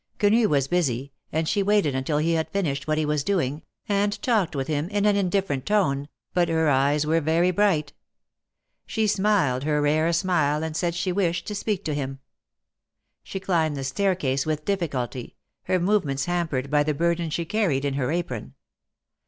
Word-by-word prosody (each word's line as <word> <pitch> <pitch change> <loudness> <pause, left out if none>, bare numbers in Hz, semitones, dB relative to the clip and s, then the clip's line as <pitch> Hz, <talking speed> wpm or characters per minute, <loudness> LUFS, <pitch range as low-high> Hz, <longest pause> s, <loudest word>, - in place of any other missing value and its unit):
Quenu 215 +1 +3
was 140 -2 +2
busy, 140 -6 0 0.2
and 160 +1 -1
she 205 +4 +1
waited 200 -7 +2
until 130 +3 -1
he 165 +2 +1
had 160 -1 0
finished 145 -8 -2
what 155 0 +1
he 155 - +1
was 150 -1 0
doing, 155 -7 -1 0.3
and 205 0 0
talked 220 - +1
with 135 -1 -1
him 155 +2 -1
in 205 0 0
an 210 -1 +4
indifferent 185 -8 0
tone, 145 -9 +1 0.2
but 175 -2 +2
her 160 -1 +2
eyes 145 +2 +2
were 165 +2 +2
very 165 +4 +2
bright. 175 -6 +1 0.9
She 220 - 0
smiled 195 -11 +2
her 150 0 +1
rare 155 +3 +2
smile 160 -4 +1
and 160 -1 -4
said 170 0 -1
she 180 +2 -1
wished 175 -2 0
to 210 - -4
speak 205 -1 -2
to 155 - -1
him. 135 -2 -3 1.0
She 195 - -6
climbed 165 -6 0
the 135 - -4
staircase 140 -3 0
with 155 -1 -3
difficulty, 140 -11 -3 0.3
her 185 0 +1
movements 170 -8 +1
hampered 160 -7 -2
by 150 0 +4
the 150 0 0
burthen 170 +1 0
she 170 +2 -2
carried 170 -8 0
in 140 - 0
her 135 -1 -1
apron. 125 - -4
160 Hz, 180 wpm, -25 LUFS, 145-190 Hz, 1.0 s, an